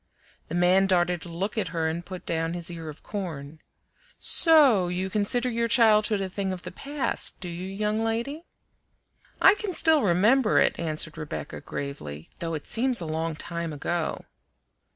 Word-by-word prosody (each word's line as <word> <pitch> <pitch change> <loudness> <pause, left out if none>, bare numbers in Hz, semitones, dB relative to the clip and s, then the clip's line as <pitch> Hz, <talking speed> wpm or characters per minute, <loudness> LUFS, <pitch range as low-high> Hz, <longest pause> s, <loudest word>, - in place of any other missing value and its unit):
The 165 - -5
man 180 +2 +4
darted 180 -2 +1
a - - -9
look 195 +7 -3
at - - -1
her 165 -2 -2
and 165 +2 -3
put 180 0 -9
down 165 0 -2
his 175 0 -3
ear 165 -2 -7
of 150 - -11
corn. 160 -7 -6 0.6
"So 280 - +5
you 185 +2 -3
consider 215 +5 +2
your 235 -1 0
childhood 215 -3 +4
a 190 - -2
thing 190 +1 -3
of 185 -1 -6
the - - -7
past, 275 -3 -1
do 180 - -4
you, 175 +2 -5
young 210 +3 -1
lady?" 235 +9 -3 0.9
"I 390 - +7
can 410 -3 -4
still 315 -2 +4
remember 215 +6 +3
it," - - +3
answered 160 -1 -3
Rebecca 80 - -6
gravely, 75 - -7
"though 165 -1 -3
it 150 - -7
seems 250 0 +1
a 170 - -4
long 160 +1 -2
time 170 +1 -4
ago." 160 +3 -3
185 Hz, 175 wpm, -26 LUFS, 165-225 Hz, 0.9 s, I